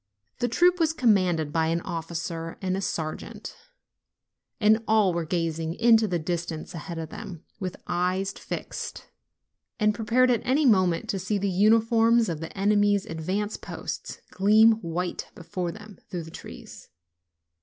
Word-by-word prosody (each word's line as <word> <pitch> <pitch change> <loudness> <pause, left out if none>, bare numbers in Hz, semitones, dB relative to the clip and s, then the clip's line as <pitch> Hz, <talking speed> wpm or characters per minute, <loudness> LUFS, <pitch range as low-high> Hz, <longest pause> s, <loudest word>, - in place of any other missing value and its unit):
The 245 - +1
troop 355 +9 +3
was 320 -1 +2
commanded 185 - +2
by 160 -1 +2
an 165 +1 0
officer 165 0 -5
and 185 -1 -1
a 195 - -2
sergeant, 160 -4 -5 1.0
and 220 0 +4
all 215 -4 +4
were 170 -1 -2
gazing 165 -1 -2
into 225 -1 +5
the 180 -3 0
distance 165 -1 -4
ahead 170 +1 -6
of 160 -1 -5
them, 170 0 -8 0.2
with 185 -2 -4
eyes 180 +2 0
fixed, - - -6
silent, - - -16 0.7
and 210 -1 +3
prepared 235 +4 +2
at 235 - +1
any 280 +4 +2
moment 185 -8 +3
to 195 - -1
see 190 +3 -1
the 200 0 -1
uniforms 225 +3 +4
of 165 -3 -3
the 165 +4 -8
enemy's 205 0 +3
advance 195 +4 -3
posts - - -6
gleam 215 +4 +6
white 175 +1 -3
before 175 0 -4
them 210 0 -12
through 175 -2 -4
the 160 - -11
trees. - - -11
190 Hz, 155 wpm, -26 LUFS, 170-220 Hz, 1.0 s, gleam